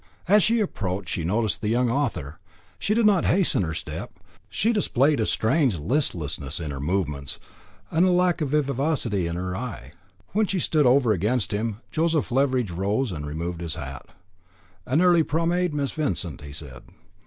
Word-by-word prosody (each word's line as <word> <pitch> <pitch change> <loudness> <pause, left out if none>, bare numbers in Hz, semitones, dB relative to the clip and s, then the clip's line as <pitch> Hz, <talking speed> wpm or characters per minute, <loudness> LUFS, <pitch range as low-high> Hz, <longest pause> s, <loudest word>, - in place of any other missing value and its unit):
As 210 +3 +6
she 230 +4 +3
approached 95 - -2
she 85 - -2
noticed 105 +3 0
the 105 - -2
young 120 +2 +2
author. 115 - -2 0.4
She 210 - 0
did 230 -1 +3
not 200 -4 +4
hasten 185 - +3
her 80 -3 -2
step. - - -6 0.4
She 225 +3 +1
displayed 145 - +2
a 110 - +1
strange 120 - +2
listlessness 80 - -2
in 80 -3 -4
her 70 - -5
movements, 75 -4 -2 0.5
and 180 +3 +4
lack 180 -2 +2
of 150 - 0
vivacity 135 - 0
in 85 - -3
her 90 +1 -3
eye. 115 +1 -6 0.4
When 215 +2 +1
she 195 - -1
stood 155 -5 +2
over 125 -2 +4
against 105 +5 0
him, 110 +1 -2
Joseph 160 -4 0
Leveridge 130 -5 +1
rose 100 +7 -1
and 75 -3 -5
removed 85 +3 -4
his 80 -2 -4
hat. 70 -3 -7 0.8
"An 150 +8 +3
early 175 -2 +5
promenade, 170 +3 0
Miss 145 -2 -1
Vincent," 145 - -2
he 75 -1 -9
said. 70 -5 -9
120 Hz, 170 wpm, -25 LUFS, -, 0.8 s, As